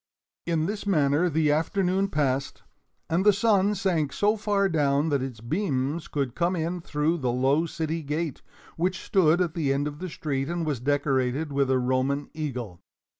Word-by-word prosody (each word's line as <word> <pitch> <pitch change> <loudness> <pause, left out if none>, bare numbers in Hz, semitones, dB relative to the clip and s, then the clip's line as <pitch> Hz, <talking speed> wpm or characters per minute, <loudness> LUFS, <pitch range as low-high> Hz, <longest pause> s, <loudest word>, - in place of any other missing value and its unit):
In 165 -2 +1
this 205 +2 -4
manner 155 -1 +3
the 155 -1 +2
afternoon 185 +5 +1
passed, 140 -5 -1 0.4
and 170 +3 +1
the 210 - +7
sun 205 0 +2
sank 170 -7 0
so 205 +7 +2
far 205 -2 +1
down 145 -3 +1
that 140 -3 +1
its 125 -4 -6
beams 145 - -1
could 140 -5 -2
come 175 +2 0
in 170 +1 -2
through 155 +2 0
the 125 -3 0
low 135 +6 +2
city 160 0 -3
gate, 150 +1 -3 0.4
which 185 +3 -1
stood 175 -4 +3
at 170 -3 0
the 155 -5 0
end 140 +2 0
of 150 0 -7
the 185 0 -5
street 140 -3 -3
and 170 -1 -2
was 145 -5 -1
decorated 140 +1 0
with 140 -1 +1
a 130 - +3
Roman 130 +3 0
Eagle. 125 - -5
155 Hz, 175 wpm, -26 LUFS, 140-175 Hz, 0.4 s, the